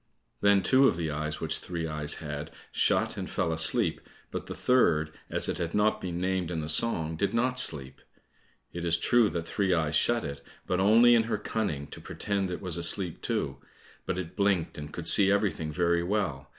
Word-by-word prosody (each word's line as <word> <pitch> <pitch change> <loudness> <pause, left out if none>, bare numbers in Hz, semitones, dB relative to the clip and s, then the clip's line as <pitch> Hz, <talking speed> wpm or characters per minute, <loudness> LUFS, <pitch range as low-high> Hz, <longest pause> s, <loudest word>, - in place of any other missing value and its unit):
Then 100 -1 +3
two 135 +5 +5
of 85 - +1
the 80 -3 -2
eyes 75 +1 -4
which - - 0
Three 85 -2 -4
eyes 75 -2 -2
had, 75 -1 -6 0.2
shut - - +1
and - - -5
fell 80 - -1
asleep, 80 0 +1 0.3
but - - -5
the - - -6
third, 80 -12 +2 0.2
as - - -1
it - - -3
had 85 +1 -3
not 105 +1 +2
been 90 -2 -4
named 95 -2 -1
in 85 -2 -3
the 75 - -5
song, 80 -2 +1
did 100 +5 -1
not 125 +2 +1
sleep. 70 - +2 0.7
It 85 - -5
is 85 -1 +3
true 115 +5 +3
that 85 -3 -3
Three 95 0 0
eyes 80 -2 0
shut 120 -1 +2
it, 70 -1 -6 0.2
but 90 - -1
only 115 +5 +6
in 115 -1 +3
her 115 - -1
cunning, 80 -11 -3
to - - -9
pretend 100 -2 -3
it 90 - -5
was 90 -2 -2
asleep 85 +1 -2
too, - - -2 0.5
but - - -2
it 90 -1 -6
blinked, 100 -4 0
and 75 0 -8
could - - -6
see 100 -1 +7
everything 100 -6 0
very 85 +2 +1
well. 85 -8 -2
85 Hz, 205 wpm, -28 LUFS, 80-100 Hz, 0.7 s, see